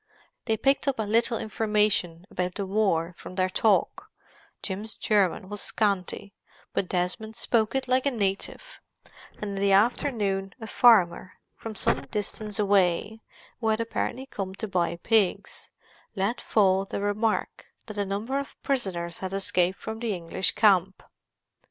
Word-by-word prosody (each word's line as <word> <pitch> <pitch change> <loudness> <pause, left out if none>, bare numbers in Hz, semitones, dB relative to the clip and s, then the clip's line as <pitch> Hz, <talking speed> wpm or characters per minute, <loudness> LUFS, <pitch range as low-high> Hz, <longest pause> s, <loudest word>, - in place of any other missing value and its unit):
They 220 -2 +1
picked 275 +5 +2
up 275 - +1
a 220 - 0
little 230 +3 +2
information 210 -6 0
about 180 0 -2
the 200 - -2
war 190 -4 +1
from 185 - -9
their 185 0 +1
talk—Jim's 210 0 -2
German 195 -2 +1
was 205 +1 -5
scanty, 200 -1 -1 0.4
but 185 - -1
Desmond 185 +5 -2
spoke 225 0 +1
it 265 -1 -1
like 255 +2 +2
a - - +5
native; 225 - -3 0.5
and 210 -1 -5
in - - -4
the 200 0 +3
afternoon 200 -3 +1
a 220 - -7
farmer 200 -7 +4 0.2
from 225 -1 -7
some - - 0
distance 210 0 -3
away, 200 +1 +2 0.4
who 225 - -2
had 220 0 +2
apparently 230 +3 -2
come 195 -7 -5
to 220 - -5
buy 175 -3 0
pigs, 205 +1 0 0.5
let 200 +4 -1
fall 195 -3 +3
the 195 - -4
remark 210 +2 -1 0.2
that 215 -2 -7
a - - +2
number 210 +8 -2
of 280 - -8
prisoners 180 -11 -1
had 190 0 -4
escaped 185 -1 +1
from 220 0 -6
the 225 -4 -1
English 175 +2 -1
camp. 195 -3 +3
205 Hz, 150 wpm, -27 LUFS, 190-225 Hz, 0.5 s, a